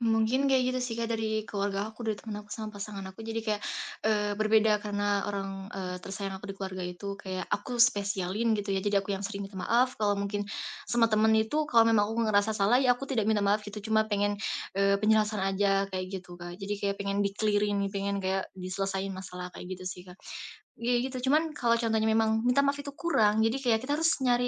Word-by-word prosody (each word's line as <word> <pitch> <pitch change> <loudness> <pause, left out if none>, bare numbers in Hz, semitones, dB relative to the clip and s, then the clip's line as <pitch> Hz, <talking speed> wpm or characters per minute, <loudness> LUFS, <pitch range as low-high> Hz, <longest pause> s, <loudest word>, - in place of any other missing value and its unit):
Mungkin 230 +4 +2
kayak 265 -2 +4
gitu 255 0 0
sih, 250 -2 -2
Kak, 230 0 -3
dari 220 -1 0
keluarga 200 0 -2
aku, 225 +1 -8
dari 220 - +1
temen 210 0 -7
aku 210 -1 -8
sama 215 -1 -5
pasangan 205 -1 -6
aku. 190 - -20
Jadi 225 0 -3
kayak, 215 -2 0 0.5
eee, 210 -1 +2
berbeda 215 0 +4
karena 205 -1 -1
orang, 195 -1 -4
eee, 185 -1 -4
tersayang 195 +1 -5
aku 205 - -10
di 195 - -5
keluarga 190 -2 -5
itu 200 +3 -6
kayak 185 -1 -4
aku 245 -2 +2
spesialin, 205 -1 +1
gitu 205 -1 -3
ya. 195 - +1
Jadi 205 +1 -1
aku 195 0 +1
yang 195 0 -2
sering 200 -2 -5
minta 195 -1 -8
maaf. 245 +7 +2
Kalau 205 -1 +2
mungkin 200 0 -2 0.4
sama 230 -1 +3
temen 220 +1 +4
itu, 220 +8 +1
kalau 235 -6 +6
memang 225 -2 +4
aku 220 - -4
nggak 230 -1 +1
ngerasa 205 +1 +3
salah, 210 +4 +4
ya 255 -2 +4
aku 275 +3 -8
tidak 225 -6 +1
minta 215 -2 +2
maaf, 200 +1 +3
gitu. 205 0 -7
Cuma 220 0 +4
pengen, 205 -1 0 0.4
eee, 200 0 +3
penjelasan 215 -1 +3
aja, 195 0 +1
kayak 185 -1 -3
gitu, 175 -2 -8
Kak. 175 0 -7
Jadi 205 +1 -2
kayak 200 0 0
pengen 200 0 -2
diklirin 205 0 +1
nih, 200 - -1
pengen 200 0 -2
kayak 190 0 0
diselesaiin 195 +1 -3
masalah, 180 -1 -7
kayak 180 - -9
gitu 185 - -11
sih, 180 -1 -6
Kak. 180 - -11 0.7
Iya, 240 +2 +1
gitu. 255 0 -4
Cuman 315 +2 +3
kalau 235 -4 +3
contohnya 225 -2 +1
memang 220 0 +3
minta 250 +3 +3
maaf 280 0 +2
itu 280 - -6
kurang, 220 -12 +2
jadi 225 +2 +2
kayak 230 -3 +3
kita 285 +3 0
harus 325 0 +4
nyari, 245 -1 +3
210 Hz, 220 wpm, -29 LUFS, 195-225 Hz, 0.7 s, kalau